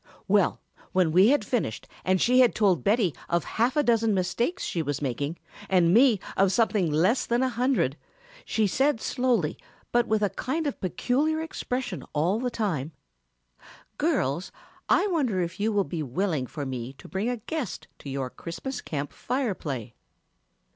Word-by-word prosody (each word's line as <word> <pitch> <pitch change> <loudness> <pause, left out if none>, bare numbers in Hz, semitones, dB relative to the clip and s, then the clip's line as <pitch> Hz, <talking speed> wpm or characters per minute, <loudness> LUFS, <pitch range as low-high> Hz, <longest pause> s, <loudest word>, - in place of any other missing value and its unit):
"Well, 200 -2 +3 0.3
when 185 -4 +3
we 185 +5 +6
had 255 -4 +3
finished 205 - -2 0.2
and 185 0 +2
she 250 +5 +4
had 250 -2 +5
told 195 -5 +3
Betty 205 - +2 0.2
of 170 0 +1
half 240 +6 0
a 295 - +4
dozen 225 -4 +3
mistakes 235 - -1
she 170 - -1
was 145 -2 -2
making 140 +4 -2 0.3
and 180 -2 +4
me 235 -2 +6 0.2
of 195 0 +3
something 205 -5 +2
less 185 - +2
than 240 +2 +2
a 260 - +2
hundred, 245 - +1 0.5
she 220 - +1
said 265 +5 +2
slowly 235 -11 0 0.3
but 240 0 +3
with 215 -1 +1
a 205 - +1
kind 315 +6 -2
of 285 - -3
peculiar 275 - 0
expression 260 -5 -4
all 170 +8 +1
the 250 0 -1
time, 165 - -2 1.1
'Girls, 140 +8 0 0.4
I - - +4
wonder 285 - 0
if 175 +1 -3
you 215 +2 +1
will 205 -2 +2
be 170 -3 -4
willing 150 0 -1
for 145 +2 -5
me 130 -1 -5
to 140 - -14
bring 200 +5 -2
a 245 - -1
guest 290 +5 -5
to 140 - -8
your 135 -2 -3
Christmas 255 +10 -6
Camp 145 -2 -4
Fire 250 -3 -1
play?' 130 - -5
205 Hz, 170 wpm, -27 LUFS, 165-245 Hz, 1.1 s, we